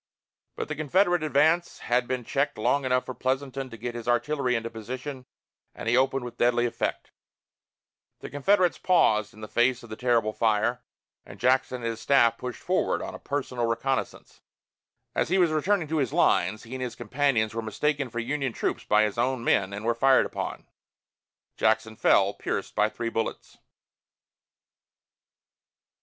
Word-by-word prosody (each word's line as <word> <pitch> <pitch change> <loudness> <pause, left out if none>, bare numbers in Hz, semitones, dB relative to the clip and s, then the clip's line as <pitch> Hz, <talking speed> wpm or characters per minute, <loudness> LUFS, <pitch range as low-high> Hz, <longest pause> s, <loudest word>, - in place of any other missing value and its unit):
But - - -4
the 150 - -3
Confederate 175 +4 +2
advance 155 +3 +2
had 120 0 0
been 130 -1 -2
checked 140 +5 -1
long 140 +5 +1
enough 125 0 +1
for 130 - -5
Pleasanton 130 +1 -2
to 115 - -10
get 120 +2 -5
his 120 -1 -7
artillery 125 +1 +1
into 115 0 -3
position, 130 +4 -7 0.5
and - - -7
he 120 - +3
opened 135 0 +1
with 120 - -8
deadly 120 0 +3
effect. 120 - -3 1.1
The - - -7
Confederates 180 +6 +2
paused 110 - +3
in 110 - -15
the 110 - -6
face 120 +2 +1
of 115 - -13
the - - -4
terrible 115 -3 +1
fire, 115 +3 +1 0.4
and - - -13
Jackson 130 0 +1
and - - -3
his 115 -1 -3
staff 115 -1 +3
pushed 125 -1 -6
forward 185 +1 0
on - - -6
a - - -8
personal 130 -4 -2
reconnoissance. 120 +3 -3 0.7
As - - 0
he 190 - +2
was 175 -4 +3
returning 165 +2 +1
to 160 - 0
his 135 -6 0
lines, 95 +5 +2
he 115 - -10
and 130 - -5
his 125 -2 -4
companions 120 -2 0
were 115 - -2
mistaken 135 +5 -1
for 120 - -8
Union 130 +2 -2
troops - - -2
by 105 0 +3
his 105 +2 -2
own 125 0 0
men 100 -4 +2
and 100 +2 -6
were 120 - +2
fired 130 +3 +4
upon. - - -5 0.9
Jackson 110 0 +1
fell, 100 -3 +3
pierced - - -4
by 105 0 +2
three 115 +1 -4
bullets. 115 -1 -4
125 Hz, 170 wpm, -26 LUFS, 115-140 Hz, 1.1 s, fired